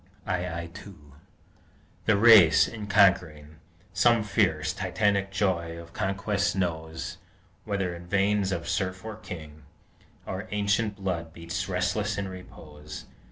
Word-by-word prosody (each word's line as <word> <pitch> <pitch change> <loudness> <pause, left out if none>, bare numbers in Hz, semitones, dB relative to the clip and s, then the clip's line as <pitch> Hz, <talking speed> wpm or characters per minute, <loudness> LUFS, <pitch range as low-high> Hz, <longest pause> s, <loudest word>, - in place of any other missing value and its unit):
II 90 -2 -2
2 90 -8 -13 0.9
The 105 -2 +4
race, 100 -8 +7
in 110 -3 -7
conquering, 85 -7 +2 0.4
Some 120 -2 +4
fierce, 80 -8 +1
Titanic 100 +1 0
joy 90 -4 -1
of 85 0 -11
conquest 100 0 -1
knows; 80 -3 -3 0.5
Whether 95 -4 -1
in 85 0 -11
veins 100 +1 +1
of 85 -2 -3
serf 95 -1 -2
or 110 -1 -5
king, 75 -7 -9 0.6
Our 95 +3 -5
ancient 105 +1 0
blood 90 -5 -4
beats 85 +3 -4
restless 90 +3 -1
in 100 -1 -2
repose. 75 -5 -10
95 Hz, 120 wpm, -27 LUFS, 85-100 Hz, 0.9 s, race